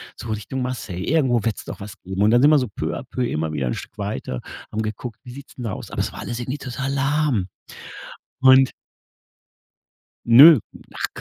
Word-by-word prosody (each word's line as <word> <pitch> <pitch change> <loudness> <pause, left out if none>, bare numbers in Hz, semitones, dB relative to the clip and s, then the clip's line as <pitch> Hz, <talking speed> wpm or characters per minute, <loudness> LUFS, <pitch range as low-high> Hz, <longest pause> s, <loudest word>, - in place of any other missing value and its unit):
so 115 - -8
Richtung 110 +5 -4
Marseille, 110 -8 -4
irgendwo 130 -6 +2
wird's 115 -3 -2
doch - - -8
was 100 0 -9
geben“ 95 +1 -4
und 105 - +4
dann 120 +1 +5
sind 145 +3 +6
wir 150 - +6
so 125 - -2
peu 100 - -4
à - - -7
peu 125 - -3
immer 80 -3 -2
wieder 70 -4 -2
'n - - -1
Stück - - -10
weiter, 60 - -4 0.3
haben 110 - -2
geguckt, 110 +2 -5
wie 125 - -10
sieht's 140 +2 -12
denn 125 - -7
da 105 - -3
aus? - - -8
Aber - - -2
es - - -2
war - - -9
alles 120 - -5
irgendwie 125 +4 -4
total 135 +1 -4
lahm 140 -7 +1 0.9
und 130 0 +6 1.5
Ne, 140 +6 +9 0.3
ach - - -2
120 Hz, 205 wpm, -22 LUFS, 105-135 Hz, 1.5 s, Ne